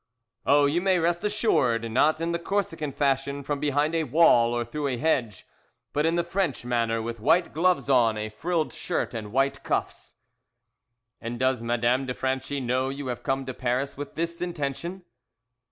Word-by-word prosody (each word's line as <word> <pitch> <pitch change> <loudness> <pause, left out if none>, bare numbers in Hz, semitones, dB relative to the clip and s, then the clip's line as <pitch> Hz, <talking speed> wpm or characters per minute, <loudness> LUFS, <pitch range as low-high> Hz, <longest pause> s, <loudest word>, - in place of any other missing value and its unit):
"Oh, 145 0 +5
you 155 +5 +1
may 190 -1 +3
rest 170 0 0
assured, 125 - +1
not 150 +6 +3
in 165 +1 -1
the 170 - -1
Corsican 170 -5 -2
fashion 140 0 0
from 145 +1 -2
behind 145 +2 +1
a 165 -1 +1
wall 120 -5 +5
or 120 0 -1
through 145 +5 -3
a 130 -3 -1
hedge, 120 -9 0 0.5
but 150 +2 +2
in 165 - +1
the 170 - +1
French 170 -7 -2
manner, 115 -2 0
with 115 0 -5
white 165 +9 +2
gloves 170 -4 +2
on, 120 -5 +3
a 105 0 -3
frilled 160 +8 -2
shirt, 175 - -2
and 110 -3 -6
white 135 +2 +1
cuffs." - - -3 1.1
"And 120 +1 -5
does 130 -2 +1
Madame 120 +3 +1
de 125 - -3
Franchi 130 +2 -2
know 130 +1 0
you 140 +1 -5
have 120 - -4
come 135 0 -1
to 130 - -4
Paris 125 +3 -1
with 145 +1 -7
this 170 +1 -3
intention?" 170 +2 -4
140 Hz, 180 wpm, -26 LUFS, 120-165 Hz, 1.1 s, Oh